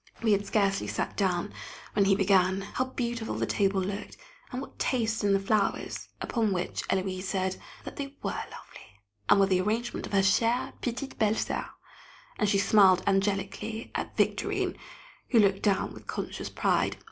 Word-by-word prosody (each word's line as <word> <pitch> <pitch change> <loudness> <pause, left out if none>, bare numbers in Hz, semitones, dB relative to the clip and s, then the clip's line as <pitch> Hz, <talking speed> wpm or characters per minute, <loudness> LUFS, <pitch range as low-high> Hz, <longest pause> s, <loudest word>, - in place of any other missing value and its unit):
We 220 - +3
had 200 0 +2
scarcely 195 -2 +1
sat - - -2
down, 190 -1 0 0.4
when 200 - +3
he 195 0 +5
began. 190 -1 +3
How 250 +6 -2
beautiful 235 -3 -3
the - - 0
table 195 -1 +1
looked, 200 +2 -5 0.3
and 250 - -3
what 275 - -9
taste 225 -4 0
in 200 - +3
the 195 - +4
flowers! 200 +1 -1
Upon 225 -4 0
which 180 -1 -2
Héloise 185 -1 -1
said, 190 -1 -1 0.3
that - - -8
they 280 -1 -5
were - - 0
lovely, 95 0 -9 0.3
and 200 - +7
were 195 - +6
the 185 -1 +2
arrangement 225 +5 -2
of - - -11
her 195 - +5
"chère 230 +6 +2
petite 255 +3 -4
belle 215 0 +3
soeur!" - - -2 0.7
and 210 - +2
she 200 - +3
smiled 195 -2 +5
angelically 200 +3 -1
at - - -4
Victorine, - - +1 0.5
who 240 - +3
looked 195 -2 +3
down 200 -2 +1
with - - -13
conscious - - -4
pride. - - +1
200 Hz, 170 wpm, -29 LUFS, 195-225 Hz, 0.7 s, and